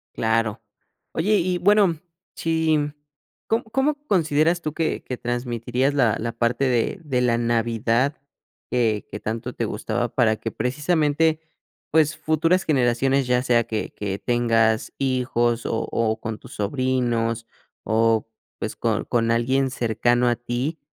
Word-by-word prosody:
Claro. 110 Hz, -1 st, 0 dB, 0.5 s
Oye 205 Hz, +6 st, +2 dB
y 180 Hz, +1 st, 0 dB
y -, -, 0 dB
bueno 195 Hz, -4 st, +3 dB, 0.4 s
si 160 Hz, -1 st, +1 dB, 0.7 s
¿com 225 Hz, +2 st, +1 dB
cómo 270 Hz, +6 st, 0 dB
consideras 165 Hz, -1 st, +2 dB
tú 155 Hz, -, -3 dB
que 160 Hz, -1 st, -1 dB
que 125 Hz, -, -5 dB
transmitirías 120 Hz, +2 st, -1 dB
la 120 Hz, -6 st, +3 dB
la 115 Hz, +1 st, -3 dB
parte 120 Hz, +3 st, 0 dB
de 125 Hz, -, 0 dB
de 130 Hz, -5 st, 0 dB
la 120 Hz, -1 st, +2 dB
Navidad 115 Hz, +3 st, +1 dB, 0.6 s
que 115 Hz, -4 st, +1 dB
que 105 Hz, -, -6 dB
tanto 115 Hz, +4 st, -4 dB
te 115 Hz, -, -2 dB
gustaba 110 Hz, +3 st, -2 dB
para 110 Hz, -4 st, +3 dB
que 115 Hz, -, -5 dB
precisamente, 155 Hz, +3 st, +1 dB, 0.5 s
pues, 155 Hz, -1 st, +3 dB
futuras 160 Hz, +4 st, +2 dB
generaciones, 135 Hz, 0 st, +2 dB
ya 125 Hz, 0 st, +2 dB
sea 120 Hz, -2 st, +3 dB
que 110 Hz, -1 st, -4 dB
que 100 Hz, -1 st, -4 dB
tengas 115 Hz, -2 st, +1 dB
hijos 125 Hz, -3 st, 0 dB
o 115 Hz, -, -1 dB
o 110 Hz, -1 st, 0 dB
con 110 Hz, -1 st, -5 dB
tus -, -, -13 dB
sobrinos 115 Hz, 0 st, -1 dB, 0.4 s
o, 115 Hz, 0 st, +2 dB, 0.3 s
pues, -, -, -4 dB
con -, -, -1 dB
con 115 Hz, -1 st, +1 dB
alguien 130 Hz, +3 st, +1 dB
cercano 120 Hz, 0 st, +1 dB
a 120 Hz, -, +2 dB
ti, 120 Hz, +7 st, -3 dB
125 Hz, 145 wpm, -23 LUFS, 115-150 Hz, 0.7 s, bueno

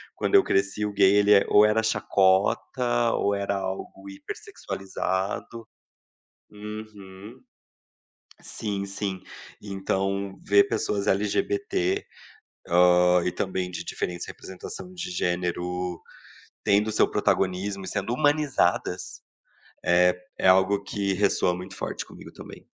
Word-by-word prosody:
quando -, -, 0 dB
eu 390 Hz, -, +8 dB
cresci 100 Hz, +2 st, 0 dB
o 105 Hz, -, -3 dB
gay 100 Hz, 0 st, +5 dB
ele 105 Hz, 0 st, +5 dB
é 100 Hz, -, +5 dB
ou 105 Hz, +1 st, +7 dB
era 110 Hz, +1 st, +2 dB
chacota, 110 Hz, +4 st, +2 dB
ou 100 Hz, 0 st, +1 dB
era 100 Hz, 0 st, -1 dB
algo 95 Hz, +1 st, -6 dB
hiper 95 Hz, -, -7 dB
sexualizado. 95 Hz, +4 st, -4 dB, 0.8 s
Uhum. 105 Hz, 0 st, -10 dB, 1.0 s
Sim, 100 Hz, -3 st, -4 dB
sim. 100 Hz, -1 st, -4 dB, 0.4 s
Então, 95 Hz, 0 st, -2 dB
ver 100 Hz, 0 st, +5 dB
pessoas 100 Hz, -1 st, -1 dB
LGBT, 380 Hz, -, 0 dB, 0.7 s
hã, 90 Hz, 0 st, +5 dB
e 90 Hz, -, -1 dB
também 95 Hz, -1 st, -2 dB
de 90 Hz, -, -6 dB
diferentes 90 Hz, -1 st, -4 dB
representação 95 Hz, -, -9 dB
de 180 Hz, 0 st, -5 dB
gênero, 90 Hz, -, -2 dB, 0.6 s
tendo 105 Hz, +2 st, +3 dB
o -, -, -2 dB
seu 105 Hz, -, +3 dB
protagonismo 95 Hz, +1 st, 0 dB
e -, -, -6 dB
sendo 105 Hz, +3 st, -2 dB
humanizadas, 145 Hz, 0 st, 0 dB, 0.6 s
eh, 90 Hz, +1 st, +4 dB, 0.2 s
é -, -, +3 dB
algo 95 Hz, +2 st, +4 dB
que 100 Hz, 0 st, -2 dB
ressoa 95 Hz, -2 st, +2 dB
muito 95 Hz, +1 st, -8 dB
forte -, -, -4 dB
comigo -, -, -13 dB
também. -, -, -12 dB
100 Hz, 120 wpm, -26 LUFS, 95-105 Hz, 1.0 s, eu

